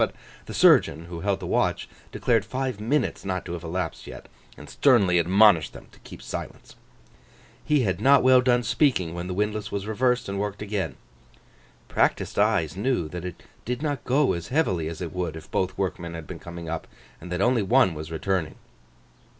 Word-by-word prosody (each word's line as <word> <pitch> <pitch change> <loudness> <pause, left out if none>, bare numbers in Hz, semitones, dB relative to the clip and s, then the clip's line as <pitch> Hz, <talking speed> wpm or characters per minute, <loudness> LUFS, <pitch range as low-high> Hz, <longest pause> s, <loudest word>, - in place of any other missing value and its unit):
But - - +1 0.3
the - - -6
surgeon 80 +4 +4
who 85 0 -7
held 100 +1 -1
the 90 - -7
watch, - - 0 0.2
declared 115 -4 +1
five 130 +1 -3
minutes 130 +8 -1
not 95 -1 -3
to - - -5
have 85 0 -6
elapsed 85 0 -4
yet, - - -10 0.3
and - - -11
sternly 100 -10 +3
admonished 95 -1 +4
them - - -13
to - - -20
keep - - -12
silence. - - -7 0.9
He 150 -2 +2
had 95 -6 -1
not 140 0 +5
well 130 0 +6
done 125 -1 +2
speaking, 115 - +1
when 85 +1 -5
the 90 - -4
windlass 105 +2 -2
was 100 -1 -3
reversed 125 +3 0
and 100 0 -3
worked 105 0 -3
again. 105 -2 -3 0.9
Practised - - 0
eyes 80 0 +2
knew 105 -4 0
that 90 +2 -6
it 90 - -8 0.2
did 125 +4 -4
not 145 -4 -2
go 135 +2 +2
as 85 -1 -5
heavily 95 - 0
as 80 +1 -6
it 85 - -5
would 90 -3 -3
if 80 - -11
both 95 0 -1
workmen 85 -3 -3
had 80 -1 -7
been - - -8
coming 85 -1 -8
up, 80 0 -4 0.3
and 90 +2 -9
that 90 - -2
only 120 +3 +3
one 115 -2 +3
was 80 +1 -7
returning. 80 0 -2
95 Hz, 190 wpm, -25 LUFS, 85-120 Hz, 0.9 s, well